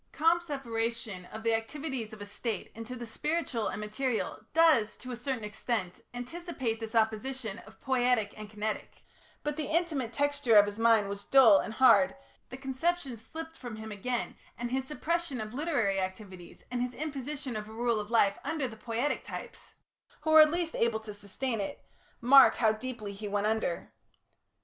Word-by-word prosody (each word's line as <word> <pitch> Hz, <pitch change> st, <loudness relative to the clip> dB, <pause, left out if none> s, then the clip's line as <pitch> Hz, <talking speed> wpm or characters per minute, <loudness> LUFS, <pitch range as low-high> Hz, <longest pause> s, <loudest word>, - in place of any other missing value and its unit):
Comte's 335 Hz, +2 st, +3 dB
separation 230 Hz, -, -3 dB
of 220 Hz, +4 st, -9 dB
the 230 Hz, 0 st, +2 dB
activities 245 Hz, 0 st, -3 dB
of 215 Hz, -1 st, -8 dB
a -, -, -7 dB
State 205 Hz, +1 st, -4 dB
into 230 Hz, +3 st, -7 dB
the 240 Hz, -1 st, -6 dB
spiritual 260 Hz, -1 st, -1 dB
and -, -, -3 dB
material 220 Hz, +3 st, -2 dB
does, 310 Hz, -10 st, +4 dB
to 255 Hz, -, -8 dB
a -, -, -3 dB
certain 245 Hz, -1 st, -3 dB
extent, 210 Hz, -3 st, -3 dB
anticipate 245 Hz, -2 st, -4 dB
this 225 Hz, 0 st, -6 dB
opposition 225 Hz, 0 st, 0 dB
of -, -, -16 dB
poietic 245 Hz, -5 st, +1 dB
and 215 Hz, -1 st, -8 dB
kinetic, 215 Hz, 0 st, -4 dB, 0.4 s
but 295 Hz, 0 st, -2 dB
the 305 Hz, -3 st, -2 dB
intimate 310 Hz, -8 st, 0 dB
texture 285 Hz, -2 st, +2 dB
of 205 Hz, -1 st, +9 dB
his 205 Hz, +1 st, -6 dB
mind 225 Hz, -3 st, +5 dB
was 200 Hz, 0 st, -6 dB
dull 240 Hz, -7 st, +7 dB
and 220 Hz, -, -4 dB
hard, 260 Hz, +2 st, +6 dB, 0.3 s
the 255 Hz, -, -7 dB
conception 270 Hz, +1 st, -1 dB
slipped 320 Hz, +9 st, -8 dB
from 245 Hz, -7 st, -7 dB
him 220 Hz, 0 st, -7 dB
again, 240 Hz, +4 st, -3 dB, 0.2 s
and 240 Hz, 0 st, -4 dB
his 265 Hz, 0 st, -1 dB
suppression 325 Hz, -2 st, -2 dB
of 215 Hz, +1 st, -5 dB
literary 250 Hz, -10 st, +1 dB
activities, 185 Hz, -2 st, -6 dB
and 245 Hz, -1 st, -1 dB
his 250 Hz, 0 st, -2 dB
imposition 280 Hz, -3 st, -4 dB
of 210 Hz, 0 st, -5 dB
a -, -, -10 dB
rule 235 Hz, 0 st, 0 dB
of 210 Hz, 0 st, -5 dB
life 205 Hz, -4 st, +3 dB
upon 320 Hz, -, -2 dB
the 260 Hz, -6 st, -2 dB
poietic 230 Hz, +6 st, -2 dB
types, -, -, -9 dB, 0.5 s
who 315 Hz, -, 0 dB
are 310 Hz, -1 st, +10 dB
least 330 Hz, +1 st, -1 dB
able 230 Hz, -1 st, +2 dB
to 220 Hz, -1 st, -8 dB
sustain 210 Hz, +3 st, -3 dB
it, 195 Hz, -, -6 dB, 0.3 s
mark 265 Hz, +2 st, +8 dB
how 220 Hz, -2 st, +4 dB
deeply 220 Hz, -2 st, -5 dB
he 205 Hz, +1 st, -6 dB
went 205 Hz, 0 st, 0 dB
under. 215 Hz, -5 st, -1 dB
235 Hz, 180 wpm, -30 LUFS, 215-275 Hz, 0.5 s, are